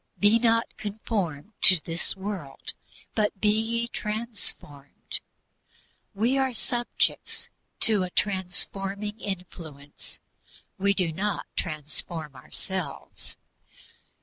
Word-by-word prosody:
"Be 210 +3 +6
not 230 0 +3
conformed 205 -5 -2
to 185 -3 +9
this 165 +4 -1
world, 190 -8 -4 0.4
but 210 -2 +1
be 210 +1 +5
ye 230 +2 +1
transformed" 210 - -4 1.0
we 240 +7 +3
are 265 -2 +1
subjects 240 +1 0 0.3
to 205 -5 +6
transforming 195 +2 0
influence, 165 -7 -7 0.6
we 200 +1 +4
do 180 -4 +4
not 200 +5 -1
transform 155 -1 -4
ourselves. 185 +8 -6
200 Hz, 90 wpm, -28 LUFS, 170-220 Hz, 1.0 s, to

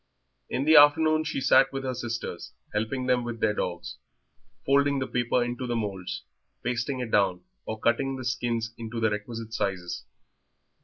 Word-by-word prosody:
In 135 - -1
the 160 +1 +6
afternoon 155 +2 +6
she 155 - -2
sat 135 0 +5
with 135 0 -4
her 130 -1 -2
sisters, 115 -1 -5 0.2
helping 110 +5 -1
them 125 -1 +2
with 120 -1 -5
their 105 -1 +2
dogs, 90 -4 -4 0.7
folding 140 +1 +3
the 130 - -1
paper 120 0 +1
into 120 +1 -4
the 120 - -1
moulds, 95 -5 -4 0.4
pasting 125 +2 -1
it 120 -3 -4
down, 95 -3 +2 0.3
or 110 0 -4
cutting 135 +4 +1
the 130 -1 -6
skins 120 -2 -1
into 115 0 -5
the 110 -1 +2
requisite 115 +2 -5
sizes. 95 -5 -2
120 Hz, 165 wpm, -27 LUFS, 110-130 Hz, 0.7 s, the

